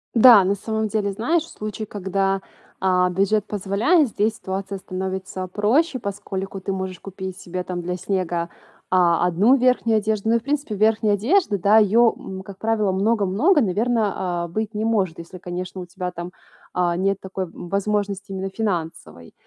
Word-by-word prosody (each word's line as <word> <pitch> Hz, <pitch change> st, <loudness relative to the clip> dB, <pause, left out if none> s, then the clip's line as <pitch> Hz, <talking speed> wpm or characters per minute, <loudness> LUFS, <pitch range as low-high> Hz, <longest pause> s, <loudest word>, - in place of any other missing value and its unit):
Да, 230 Hz, -4 st, +9 dB
на 195 Hz, +2 st, +1 dB
самом 220 Hz, +2 st, -2 dB
деле, 205 Hz, -1 st, -1 dB
знаешь, 305 Hz, -, 0 dB
в -, -, -14 dB
случае, 215 Hz, +1 st, -6 dB
когда, 195 Hz, -1 st, -1 dB, 0.4 s
а, 180 Hz, -1 st, +2 dB
бюджет 195 Hz, +3 st, +1 dB
позволяет, 215 Hz, -, +2 dB
здесь 215 Hz, +1 st, 0 dB
ситуация 195 Hz, 0 st, -5 dB
становится 190 Hz, 0 st, -5 dB
проще, 250 Hz, -, +1 dB
поскольку 195 Hz, -2 st, -5 dB
ты 195 Hz, -, -3 dB
можешь 190 Hz, -2 st, -4 dB
купить 190 Hz, -1 st, -7 dB
себе 180 Hz, 0 st, -5 dB
там 180 Hz, -1 st, -4 dB
для 180 Hz, +1 st, -3 dB
снега, 175 Hz, -2 st, -2 dB, 0.4 s
а, 175 Hz, -2 st, +3 dB
одну 200 Hz, +10 st, +4 dB
верхнюю 250 Hz, -3 st, +3 dB
одежду. 215 Hz, 0 st, -1 dB
Ну 230 Hz, -, +4 dB
и, -, -, +3 dB
в 225 Hz, -, -22 dB
принципе, 280 Hz, -5 st, -2 dB
верхняя 215 Hz, 0 st, +3 dB
одежда, 235 Hz, -, +2 dB
да, 200 Hz, +4 st, +5 dB
ее, 220 Hz, +2 st, +5 dB
м, 190 Hz, 0 st, -8 dB
как 195 Hz, 0 st, -11 dB
правило, 220 Hz, -2 st, +1 dB
много-много, 215 Hz, -, +2 dB
наверно, 200 Hz, -4 st, 0 dB
а, -, -, -6 dB
быть 215 Hz, +5 st, -3 dB
не 215 Hz, +1 st, -2 dB
может, 195 Hz, -8 st, 0 dB
если, 170 Hz, +2 st, -9 dB
конечно, 180 Hz, +1 st, -6 dB
у -, -, -7 dB
тебя 180 Hz, +1 st, -5 dB
там, 175 Hz, 0 st, -7 dB, 0.4 s
а, 175 Hz, -1 st, +1 dB
нет 195 Hz, +2 st, +1 dB
такой, 190 Hz, 0 st, -4 dB
м, 175 Hz, 0 st, -10 dB
возможности 200 Hz, 0 st, -1 dB
именно 190 Hz, 0 st, -3 dB
финансовой. 170 Hz, -, -4 dB
195 Hz, 175 wpm, -22 LUFS, 185-220 Hz, 0.4 s, Да